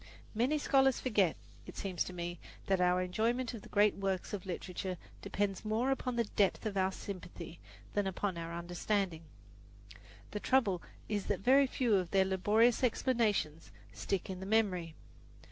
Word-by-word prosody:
Many 250 +7 +2
scholars 270 -3 +3
forget, 205 -9 +2 0.3
it - - -9
seems 190 -3 -1
to - - -6
me, 175 -1 -5 0.3
that 190 -1 +2
our 180 0 +3
enjoyment 230 +7 0
of 230 - -7
the - - -13
great 210 0 +4
works 195 -1 -2
of 195 -2 -4
literature 185 0 -4 0.2
depends 200 -2 -1
more 225 +5 +1
upon 255 -2 -1
the 235 - +2
depth 205 -2 +1
of 210 -2 -2
our 190 0 +2
sympathy 180 -3 -8 0.3
than 205 -1 +1
upon 190 0 -2
our 165 0 -5
understanding. 175 +1 -1 1.1
The 210 - -3
trouble 205 -8 +2 0.3
is 205 -2 -2
that 195 -3 0
very 270 +5 +5
few 250 -3 +1
of 180 -2 -1
their 190 -1 +4
laborious 210 +6 +3
explanations 220 - +1 0.2
stick 195 -3 -2
in 185 -1 -5
the 190 - -6
memory. 185 -7 +1
200 Hz, 160 wpm, -33 LUFS, 180-225 Hz, 1.1 s, very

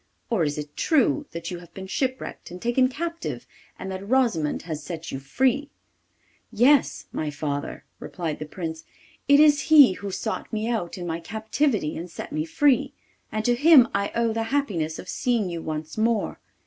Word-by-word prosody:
Or 210 -8 +2
is 145 -1 -1
it 150 0 -7
true 300 0 +2
that 170 +1 -6
you 175 - -5
have 175 -1 -15
been 190 - -7
shipwrecked 260 +6 -3
and 180 - -8
taken 240 +4 +2
captive, 335 +5 -5 0.3
and 190 - -6
that 190 0 -5
Rosimond 230 - +1
has 160 -3 -5
set 165 0 -6
you 135 - -4
free?' 265 - 0 0.8
'Yes, 245 +5 +3
my 155 - -2
father,' 145 -1 -4 0.2
replied 165 -4 -4
the 155 - -6
Prince. 160 -1 -6 0.4
'It 285 0 +6
is 295 -1 +6
he 290 -8 +9
who 200 +2 -6
sought 220 +3 -4
me 220 0 -2
out 215 -8 -2
in 175 - -5
my 165 -1 -3
captivity 220 - -1
and 170 +2 -6
set - - -8
me 155 +1 -1
free, 280 - +2 0.4
and 215 0 -2
to 245 - +4
him 275 -1 +7
I 200 0 0
owe 230 -1 +1
the 225 0 -1
happiness 185 - -1
of - - -9
seeing 230 -7 0
you 170 -1 -4
once 155 +3 -5
more. 225 -1 0
210 Hz, 185 wpm, -25 LUFS, 165-255 Hz, 0.8 s, he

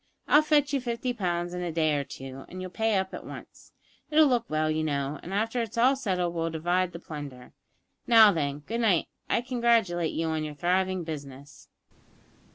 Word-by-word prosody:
I'll 295 - +6
fetch 295 -2 +2
you 275 - +1
fifty 245 +1 -2
pounds 175 -5 -2
in 180 - -4
a 175 -1 -2
day 155 -1 +1
or 145 -1 0
two, 135 0 -9
and 185 - -8
you'll 185 -1 -6
pay 220 +2 0
up 190 0 -2
at - - -6
once. - - -11 0.4
It'll 310 0 +6
look 245 -4 +1
well, 155 0 0
you 155 0 -1
know, 140 -1 -2
and 175 - -9
after 225 +4 0
it's 230 0 -5
all 255 +4 +5
settled 185 -9 -1
we'll 165 -1 -1
divide 175 +3 0
the 170 - -7
plunder. 145 -6 -9 0.5
Now 225 -3 +8
then, 145 -4 -2
good 230 +10 -3
night. 200 -7 +2 0.2
I - - +2
congratulate 230 -9 +1
you 165 - -1
on 160 -1 -1
your 150 -1 -6
thriving 185 +3 0
business." 145 -3 -9
180 Hz, 195 wpm, -27 LUFS, 155-230 Hz, 0.5 s, Now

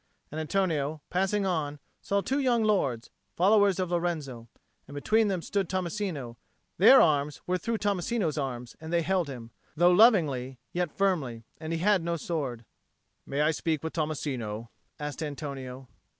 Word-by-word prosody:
And 155 +2 -3
Antonio, 155 -4 0
passing 195 +2 +1
on, 155 -6 -1 0.2
saw 200 0 0
two 270 +7 -1
young 245 -4 +2
lords, 140 - 0 0.2
followers 200 +1 +4
of 180 -2 -1
Lorenzo. 155 -9 -2 0.4
And 140 - -10
between 215 +9 +2
them 185 -4 -1
stood 195 -3 -1
Tommasino; 175 - -3 0.4
their 240 +8 +9
arms 145 -2 +2
were 180 0 0
through 230 +6 -1
Tommasino's 200 -3 0
arms 125 -4 -4
and 160 0 -7
they 170 -1 +2
held 185 -2 +1
him, 120 -3 -8 0.3
though 175 +2 +6
lovingly, 155 - +4 0.2
yet 175 -3 -2
firmly; 150 -13 0 0.2
and 160 0 -5
he 165 - 0
had 195 +2 +3
no 170 0 -1
sword. 140 -8 -3 0.6
"May 140 +2 -1
I 150 +1 +4
speak 160 -1 -2
with 160 - -4
Tommasino?" 130 -8 -3 0.3
asked 150 +1 -5
Antonio. 135 -4 -6
160 Hz, 155 wpm, -28 LUFS, 140-190 Hz, 0.6 s, their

